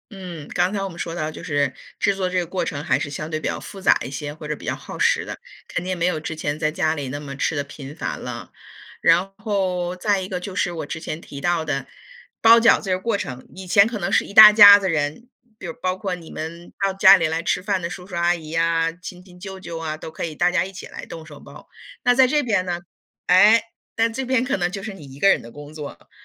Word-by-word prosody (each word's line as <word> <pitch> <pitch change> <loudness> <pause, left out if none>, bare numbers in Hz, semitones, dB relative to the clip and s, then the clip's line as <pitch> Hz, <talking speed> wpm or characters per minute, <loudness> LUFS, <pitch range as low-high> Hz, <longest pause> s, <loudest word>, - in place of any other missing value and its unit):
嗯， 180 -6 -8
刚 180 +2 0
才 200 -1 -2
我 195 - -3
们 170 -1 -11
说 165 - -4
到， 155 -2 -3
就 155 - -10
是 145 -3 -1 0.2
制 200 - +2
作 185 -1 -1
这 185 - -2
个 180 - 0
过 180 +2 -3
程， 145 -2 -4
还 - - +1
是 145 - -4
相 155 +2 -6
对 155 -1 -3
比 - - -4
较 - - -3
复 195 - -10
杂 190 - +4
一 130 - -7
些， 145 +2 -5
或 155 0 -11
者 150 - -2
比 - - -12
较 - - -1
耗 - - -10
时 - - +2
的， - - -8 0.3
肯 180 - -3
定 185 0 -2
没 170 - 0
有 180 -3 0
之 160 +1 -5
前 150 -1 -3
在 155 -1 +1
家 155 0 0
里 145 -3 -5
那 145 +3 -5
么 140 -2 -7
吃 150 - -1
得 145 - -1
频 140 0 -10
繁 - - -4
了。 - - -7 0.5
然 175 +4 +3
后， 185 -4 -2
再 200 +2 0
一 185 - -5
个 185 -2 -4
就 190 +1 -7
是 180 -2 -1
我 165 - -5
之 160 - -6
前 160 0 -6
提 140 - -10
到 170 +2 0
的， 140 -4 -3 0.5
包 230 +1 +8
饺 230 - +5
子 195 - -6
这 185 0 +1
过 225 +2 -1
程， 130 -8 -7
以 190 0 -9
前 200 +3 +5
可 225 -2 -5
能 190 +1 -2
是 - - +3
一 - - -11
大 215 0 +11
家 205 -1 +10
子 195 -2 -2
人， 155 +9 -2 0.3
比 - - -10
如 165 - -5
包 185 0 0
括 190 0 -4
你 170 -3 -8
们 170 +2 -8
到 195 - +1
家 195 0 +8
里 170 -4 +1
来 160 +1 -2
吃 180 +1 -1
饭 195 -2 -1
的 170 - -3
叔 180 0 -8
叔 185 - -14
阿 170 +1 +2
姨 160 -3 -10
呀， 165 0 +1
亲戚 180 +1 -12
舅 190 +1 -8
舅 170 -3 -7
啊， 160 -1 -4
都 155 - -9
可 160 - -5
以 160 -2 -6
大 175 +3 +2
家 185 0 +1
一 195 - -10
起 180 - -9
来 - - -9
动 160 -1 -10
手 150 -2 -12
包。 - - -14 0.3
那 245 - +4
在 260 +1 +5
这 295 +3 +1
边 205 -7 0
呢， 175 -1 -3 0.5
哎， 205 +5 +6 0.3
但 230 0 +1
这 260 +3 -4
边 255 -1 +1
可 255 -3 -1
能 175 -1 0
就 195 +1 -7
是 215 - -6
你 160 -7 -12
一 135 0 -13
个 195 - +5
人 - - +3
的 115 - -12
工 145 +1 -11
作 150 -2 -7
了。 85 - -21
175 Hz, 300 characters per minute, -22 LUFS, 155-195 Hz, 0.5 s, 大